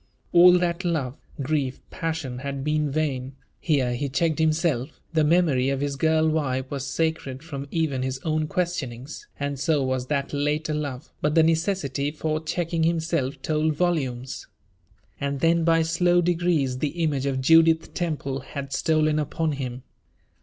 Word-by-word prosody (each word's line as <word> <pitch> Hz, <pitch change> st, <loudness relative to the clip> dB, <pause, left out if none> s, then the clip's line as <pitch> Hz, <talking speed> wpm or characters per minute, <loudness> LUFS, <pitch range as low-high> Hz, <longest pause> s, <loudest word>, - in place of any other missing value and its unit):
All 175 Hz, +1 st, +8 dB
that 175 Hz, +1 st, -1 dB
love, 150 Hz, -7 st, -1 dB, 0.3 s
grief, 135 Hz, -2 st, -1 dB
passion, 160 Hz, -6 st, -3 dB
had 140 Hz, 0 st, -4 dB
been 150 Hz, 0 st, +1 dB
vain; 135 Hz, -3 st, -2 dB, 0.3 s
here 135 Hz, -7 st, +1 dB
he 140 Hz, +3 st, -2 dB
checked 160 Hz, +4 st, 0 dB
himself; 155 Hz, -4 st, 0 dB
the 160 Hz, -1 st, +3 dB
memory 150 Hz, -5 st, +3 dB
of 135 Hz, -1 st, 0 dB
his 145 Hz, -1 st, -1 dB
girl 160 Hz, +2 st, +2 dB
wife 135 Hz, -4 st, -1 dB
was 140 Hz, -2 st, -3 dB
sacred 150 Hz, -3 st, -2 dB
from 140 Hz, -4 st, -6 dB
even 155 Hz, -5 st, -1 dB
his 130 Hz, 0 st, -2 dB
own 155 Hz, -1 st, 0 dB
questionings; 150 Hz, -7 st, -3 dB
and 140 Hz, -1 st, -2 dB
so 145 Hz, 0 st, +2 dB
was 130 Hz, -1 st, -1 dB
that 140 Hz, 0 st, -1 dB
later 150 Hz, +2 st, 0 dB
love, 145 Hz, -3 st, -4 dB
but 150 Hz, +1 st, +1 dB
the 165 Hz, -, +6 dB
necessity 160 Hz, -4 st, 0 dB
for 155 Hz, +1 st, -2 dB
checking 165 Hz, +1 st, -1 dB
himself 160 Hz, -4 st, 0 dB
told 155 Hz, 0 st, +1 dB
volumes. 135 Hz, -7 st, -1 dB, 0.7 s
And 140 Hz, -1 st, -2 dB
then, 165 Hz, +1 st, +3 dB
by 165 Hz, 0 st, +4 dB
slow 175 Hz, +2 st, +3 dB
degrees, 165 Hz, -7 st, +1 dB
the 165 Hz, +4 st, -2 dB
image 140 Hz, -3 st, 0 dB
of 135 Hz, -1 st, 0 dB
Judith 165 Hz, +3 st, +4 dB
Temple 150 Hz, -6 st, -2 dB
had 140 Hz, +1 st, -7 dB
stolen 155 Hz, 0 st, +2 dB
upon 155 Hz, +2 st, -1 dB
him. 130 Hz, -3 st, -5 dB
150 Hz, 155 wpm, -25 LUFS, 135-165 Hz, 0.7 s, All